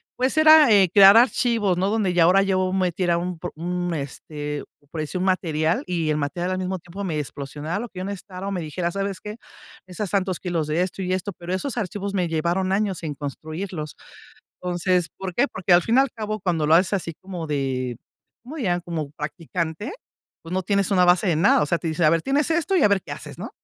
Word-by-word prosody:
Pues, 260 +4 0
era, 310 -5 +8
eh, 195 -4 +6
crear 200 +2 +9
archivos, 230 -6 +3
¿no?, 190 +2 +1
donde 210 -4 0
ya 175 -1 +4
ahora 190 +3 +5
yo 185 -1 +1
metiera 180 -2 +1
un 175 -1 -4
pro - - -5
un, 175 +1 -3
este, 145 0 -5 0.3
por 160 -1 -4
decir, 155 +5 -4
un 185 - -1
material, 165 -4 0
y 165 -4 -1
el - - +1
material, 175 +5 -2
al 185 - -1
mismo 185 0 -3
tiempo, 185 +4 -8
me 160 -5 -2
explosionara 145 +4 -5
lo 240 -1 -5
que 185 - -9
yo 185 - -4
necesitara 195 -1 -6
o 200 - -2
me 180 -3 -2
dijera: 170 +3 -3
"¿Sabes 195 +1 -3
qué?, 210 0 -7 0.5
necesitas 185 +1 -5
tantos 190 -3 0
kilos 170 -4 -2
de 155 +3 0
esto 185 +1 -3
y 185 0 -2
esto", 190 +1 -2
pero 175 +1 -6
esos 270 +9 -2
archivos 200 -1 -3
me 180 -4 0
llevaron 175 +4 0
años 195 -3 -1
en 150 -3 -4
construirlos. 155 +3 -6 0.7
Entonces, 180 0 0
¿por 190 -1 -5
qué? 270 +10 +2
Porque, 185 -6 -1
al 175 0 +6
fin 230 - 0
y - - +6
al 275 -1 +1
cabo, 215 -2 -4
cuando 170 -5 0
lo 155 - +5
haces 180 +3 +4
así 170 -4 -3
como 180 -4 -6
de 130 -4 -2 0.5
como 295 +6 -9
ya, 175 -7 0
como 160 -4 -5
practicante, 165 - -4 0.5
pues, 165 +2 -7
no 185 - 0
tienes 200 +1 +1
una 180 -2 +4
base 180 +3 +4
de 165 -4 +2
nada, 185 +6 +4
o 150 - +1
sea, 170 - +1
te 165 - -7
dicen: 160 0 +1
"A - - +6
ver, 165 0 +2
tienes 280 - +1
esto 340 +3 +1
y 330 - +3
a - - +6
ver 200 -2 +2
qué - - -8
haces", - - -8
¿no? - - -6
180 Hz, 230 wpm, -23 LUFS, 165-200 Hz, 0.7 s, crear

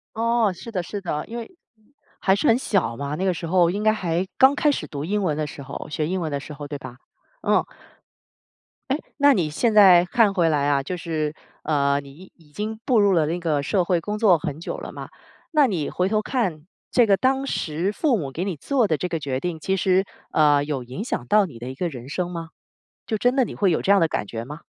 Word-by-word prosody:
哦， 230 -2 +2
是 190 +6 -10
的， 185 -5 -1
是 200 +4 -6
的， 150 -5 -3
因 235 - -6
为 285 +10 -9 0.6
还 190 - +3
是 200 - +1
很 230 - +6
小 195 - 0
嘛， 140 +2 -4
那 185 +5 -2
个 185 - +2
时 165 - -5
候 175 0 +3
应 200 +4 -2
该 215 0 +4
还 180 -3 -1
刚 265 +1 +6
开 295 0 +2
始 - - -3
读 145 0 -6
英 205 +5 -1
文 155 -6 0
的 155 - -1
时 145 -1 -9
候， 135 +2 -7
学 150 0 -1
英 185 +2 -1
文 160 -4 -3
的 140 - -2
时 150 - -9
候 145 0 -7
对 145 0 -6
吧？ 130 -2 -10 0.5
嗯， - - +3 1.3
哎， 270 +2 +1 0.2
那 285 0 +5
你 175 - +1
现 220 +10 0
在 190 -5 +7
看 205 +2 +2
回 170 -3 +3
来 145 -2 +1
啊， 140 -1 +2
就 180 +6 -5
是 155 -3 -2 0.3
呃， 140 -2 +1
你 140 - -13
已 185 +6 -15
已 155 -4 -23
经 215 +5 -4
步 245 -5 +3
入 200 -1 +4
了 160 -3 +3
那 170 +4 -2
个 155 -4 0
社 185 +7 +1
会 175 -1 +1
工 210 +4 -3
作 200 -6 +5
很 155 -2 -5
久 - - -4
了 - - -8
嘛， - - -8 0.4
那 300 -3 +5
你 175 - -2
回 180 +2 -1
头 215 0 +2
看 195 - -2 0.2
这 240 -3 +4
个 200 - +4
当 265 +4 +1
时 170 - -1
父 245 +1 +1
母 140 -5 -4
给 170 +7 -3
你 195 -2 -2
做 250 - +1
的 155 -5 0
这 180 - -2
个 170 -2 -2
决 135 -3 -3
定， 175 0 -3
其 190 +5 -1
实， 190 +1 +3 0.3
呃， 145 -2 +4
有 145 -3 -3
影 130 +11 -6
响 125 - -3
到 210 +7 +4
你 135 -10 -11
的 120 +2 -7
一 130 - -7
个 175 +5 -2
人 130 -3 -9
生 180 +3 -2
吗？ 165 -2 -6 0.6
就 220 - -1
真 245 +5 +1
的 260 - +4
你 - - -8
会 195 -3 +2
有 160 - +1
这 200 - +4
样 200 - +4
的 165 - +3
感 105 - -2
觉 115 +1 -5
吗？ 150 +5 -9
175 Hz, 270 characters per minute, -23 LUFS, 150-210 Hz, 1.3 s, 在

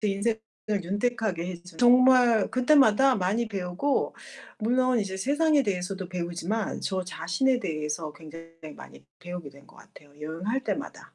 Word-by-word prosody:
제 210 - 0
인생을 220 +3 -1 0.4
윤택하게 205 -2 -1
해 185 - -4
준 180 -2 -15
정말 245 -3 +5
그때마다 265 -1 +4
많이 210 +5 0
배우고 195 +7 -2 0.4
물론 250 +2 +2
이제 195 -2 -3
세상에 290 +7 +2
대해서도 185 -2 -3
배우지만, 180 +4 -3
저 190 -2 -2
자신에 215 +10 0
대해서 155 -2 -4
굉장히 165 +1 -12 0.3
많이 70 +1 -14 0.2
배우게 175 -4 -7
된 140 +1 -17
것 - - -20
같아요 145 -1 -18
여행할 185 - -3
때마다. - - -5
195 Hz, 335 characters per minute, -27 LUFS, 175-245 Hz, 0.4 s, 정말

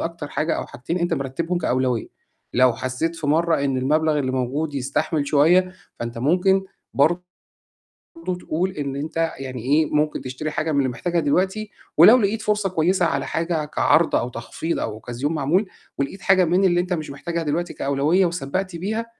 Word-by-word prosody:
أكتر 165 -3 -4
حاجة 155 +2 -1
أو - - -4
حاجتين 165 +8 -4
أنت 175 0 0
مرتّبهم 165 +7 -2
كأولوية. 130 -6 0 0.5
لو 125 0 +5
حسّيت 130 +8 -3
في 160 -2 -4
مرّة 160 0 +2
إن 135 -2 0
المبلغ 150 +3 +2
اللي 130 -2 -1
موجود 135 +4 -2
يستحمل 140 +3 -1
شوية، 175 +6 +4 0.3
فأنت 120 0 -4
ممكن 185 +8 +3 0.3
برضه 165 +6 +3 1.2
تقول 180 +3 -1
إن 140 -5 -4
أنت 160 +3 -2
يعني 130 -3 -6
إيه، 145 +6 +3
ممكن 150 0 +1
تشتري 130 +4 -5
حاجة 155 +1 -1
من 145 - 0
اللي 135 -2 +1
محتاجها 170 +7 -1
دلوقتي 190 +8 0 0.3
ولو 205 +10 +9
لقيت 215 -1 0
فرصة 210 -2 0
كويسة 180 +1 +2
على - - 0
حاجة 165 -2 -1
كعرض 160 +2 +2
أو 120 - 0
تخفيض 125 +7 -4
أو 110 - -3
أوكازيون 120 +7 -4
معمول 160 +7 +1 0.3
ولقيت 140 +8 -3
حاجة 190 -2 +4
من 180 +4 +2
اللي 175 -1 +3
أنت 180 +1 -1
مش 155 -4 -4
محتاجها 170 +4 -4
دلوقتي 170 +3 -2
كأولوية 145 +7 +2
وسبّقت 175 +3 -2
بيها 215 +7 -2
160 Hz, 170 wpm, -22 LUFS, 140-175 Hz, 1.2 s, ولو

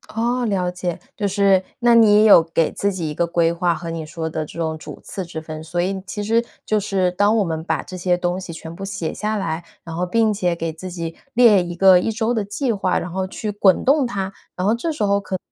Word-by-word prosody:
哦， 240 +2 0
了 185 -5 0
解， 180 -1 -3 0.2
就 205 - 0
是， 195 -1 +3 0.2
那 240 -1 +4
你 215 -2 +6
有 210 -5 +8
给 165 0 0
自 200 -1 -1
己 170 -4 -3
一 - - -4
个 170 +3 0
规 170 -1 +2
划 170 0 0
和 170 - -6
你 165 -1 -4
说 160 +1 -5
的 155 -1 -3
这 155 - -12
种 160 -1 -2
主 - - -10
次 190 - -6
之 165 -2 -7
分， 155 0 -7
所 175 +2 -2
以 190 +1 -2
其 205 +3 -4
实 230 +3 +1 0.2
就 215 - +1
是 190 -3 0
当 205 +4 +2
我 210 - +3
们 160 -2 -3
把 - - -1
这 185 - -8
些 180 0 +1
东 180 +1 -1
西 185 -3 -7
全 160 0 -8
部 195 +3 -7
写 195 -5 -4
下 215 0 -2
来， 170 -4 -3 0.2
然 165 - -8
后 180 +2 -1
并 220 +3 +2
且 180 -4 0
给 165 -1 -3
自 165 +4 -8
己 170 -2 -5 0.2
列 230 -5 +6
一 175 0 -6
个 185 0 +6
一 180 - -1
周 225 +1 0
的 220 -4 -1
计 215 +6 -1
划， 195 -4 0
然 175 - -6
后 190 +1 -2
去 210 +3 -4
滚 200 -3 +3
动 275 -1 +3
它， 195 -4 -3 0.2
然 185 - -2
后 210 - +3
这 310 +8 -2
时 295 - -2
候 200 0 +2
可 190 -2 -4
185 Hz, 275 characters per minute, -21 LUFS, 170-210 Hz, 0.2 s, 有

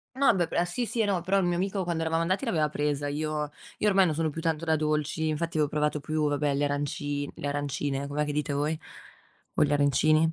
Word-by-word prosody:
No 270 -4 +4
beh 175 -2 +1
p 170 - +1
sì 235 +8 -2
sì, 225 0 0
no, 195 -3 +1
però 185 +3 +1
il 195 - +2
mio 175 0 +1
amico 190 +1 -1
quando 170 -2 -1
eravamo 165 0 +1
andati 185 +9 0
l'aveva 160 - +1
presa, 145 -1 -1
io 150 0 -2 0.3
io 210 - +2
ormai 195 -1 +5
non 155 - 0
sono 160 0 0
più 165 +2 -5
tanto 165 0 -1
da 160 -1 +2
dolci, 155 +1 0
infatti 165 +2 -2
avevo 150 -2 +3
provato 150 0 0
più, 155 +1 0
vabbè, 145 0 +1
le 145 +1 +1
aranci 145 0 -2
le - - -5
arancine, 145 -1 -2
com'è 150 +1 0
che 150 - -2
dite 150 0 -1
voi? 150 +3 0 0.8
O - - +4
gli 145 - 0
arancini? 155 +3 +3
155 Hz, 235 wpm, -28 LUFS, 145-170 Hz, 0.8 s, ormai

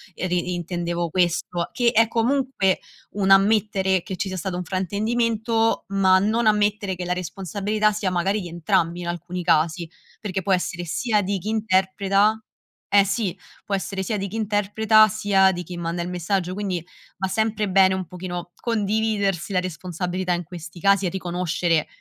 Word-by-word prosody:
e 185 - -3
di 180 0 -1
intendevo 175 0 -3
questo." 175 -1 0
Che 240 -1 +2
è 225 -1 +4
comunque 235 -4 +1 0.3
un 195 -1 -1
ammettere 195 -1 +3
che 190 - -5
ci 195 - -3
sia 185 - -4
stato 180 +1 -3
un 180 - -3
fraintendimento, 225 +5 0
ma 190 -1 +4
non 220 +4 +1
ammettere 210 -2 +1
che 180 0 -5
la 180 - 0
responsabilità 200 +4 -1
sia 205 -2 -1
magari 190 +4 0
di 180 - -6
entrambi 170 0 0
in 175 - -5
alcuni 175 +1 -4
casi, 165 +1 +2 0.3
perché 195 -3 -3
può 190 +1 +1
essere 175 -1 -1
sia 210 +5 0
di 200 0 -1
chi 210 +4 -5
interpreta 200 0 +2 0.5
eh 200 0 +6
sì, 200 -2 -1 0.3
può 200 - -1
essere 195 0 -3
sia 210 +3 -2
di 195 0 -3
chi 220 - -5
interpreta, 215 +1 +4
sia 195 -2 +3
di 175 -1 -4
chi 175 +1 -8
manda 170 0 -3
il 170 - -4
messaggio, 180 +1 -1
quindi 190 -4 -3 0.3
va 190 - -1
sempre 220 +1 0
bene 190 0 +5
un 190 -1 -3
pochino 175 0 -6
condividersi 210 -4 0
la 185 - +2
responsabilità 180 +1 -3
in 175 0 -2
questi 175 0 -10
casi 200 +2 +3
e - - +1
riconoscere 175 -3 -1
190 Hz, 170 wpm, -23 LUFS, 180-210 Hz, 0.5 s, eh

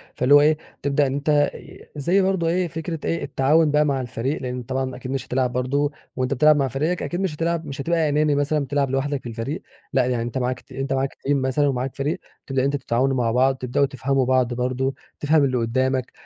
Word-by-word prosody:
فاللي 130 +3 +3
هو 145 - +9
إيه، 155 +1 +4 0.2
تبدأ 140 0 +2
إن 130 - -2
أنتَ 145 +1 +2
ي - - -13
زي 170 +7 +2
برضو 190 -3 +1
إيه 175 +2 +1
فكرة 165 0 -5
إيه 165 - -1
التعاون 150 +3 +3
بقى 150 +1 +3
مع 140 -2 0
الفريق. 130 +4 -3
لأن 125 -1 -4
طبعًا 130 +1 -3
أكيد 130 0 -7
مش 135 -1 -3
هتلعب 125 -1 0
برضو 140 +3 0 0.2
وأنتَ 130 +1 0
بتلعب 150 +3 +5
مع 140 -2 +1
فريقك، 155 +8 -1
أكيد 175 - -3
مش 185 -6 -1
هتلعب، 165 +1 -1
مش 140 -1 -5
هتبقى 165 0 +1
أناني 150 0 +2
مثلًا 145 +2 +1
بتلعب 140 0 0
لوحدك 135 +1 -1
في 120 - -6
الفريق. 115 +7 -4 0.3
لأ، 130 -2 +3
يعني 125 -2 0
أنتَ 120 +2 -4
معاك 125 -1 -1
ت - - -28
أنتَ 135 0 -2
معاك 135 0 -1
teram 140 - -4
مثلًا، 135 +2 +1
ومعاك 130 -1 -2
فريق، 150 +6 -2 0.3
تبدأ 135 -1 0
أنتَ 140 +1 +1
تتعاونوا 135 0 0
مع 115 -2 +1
بعض، 130 +3 +3
تبدأوا 130 +2 +1
تفهموا 135 0 0
بعض 130 -1 +2
برضو، 130 +2 -1 0.2
تفهم 150 0 +3
اللي 130 -2 +1
قدّامك 130 +2 0
135 Hz, 220 wpm, -23 LUFS, 130-150 Hz, 0.3 s, هو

